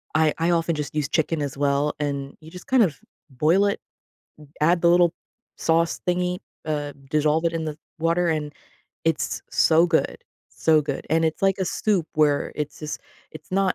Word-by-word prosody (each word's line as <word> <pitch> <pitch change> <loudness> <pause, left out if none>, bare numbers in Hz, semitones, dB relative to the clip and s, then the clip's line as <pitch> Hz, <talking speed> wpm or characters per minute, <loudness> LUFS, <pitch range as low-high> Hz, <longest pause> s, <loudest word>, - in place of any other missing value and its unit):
I 155 -1 +4
I 165 +1 +1
often 170 -1 +1
just 150 0 -5
use 150 -1 -1
chicken 160 -1 0
as 140 -1 -4
well, 145 +1 +1
and 140 -1 -3
you 160 0 -13
just 180 +1 -11
kind 255 -3 +5
of 150 -10 -1 0.3
boil 160 +10 +3
it, 200 - -1 0.8
add 170 +3 +3
the 170 - +5
little 175 -1 +5 0.4
sauce 165 0 +1
thingy, 180 0 0 0.3
uh, 145 -2 -2 0.2
dissolve 155 +2 +2
it 165 - +2
in 165 -1 -2
the 155 -1 -4 0.2
water, 170 +2 +1
and 150 -2 -1 0.5
it's 165 -2 -1
so 165 +2 +4
good. 165 -2 +1 0.3
So 155 -1 +3
good, 140 -2 -4
and 165 0 +3
it's 160 +4 -1
like 195 0 +3
a 190 - 0
soup 185 -3 0
where 150 -2 +2
it's 150 -1 -4
just 150 -1 -5 0.3
it's 155 -1 -12
not 190 0 +2
160 Hz, 185 wpm, -24 LUFS, 150-170 Hz, 0.8 s, kind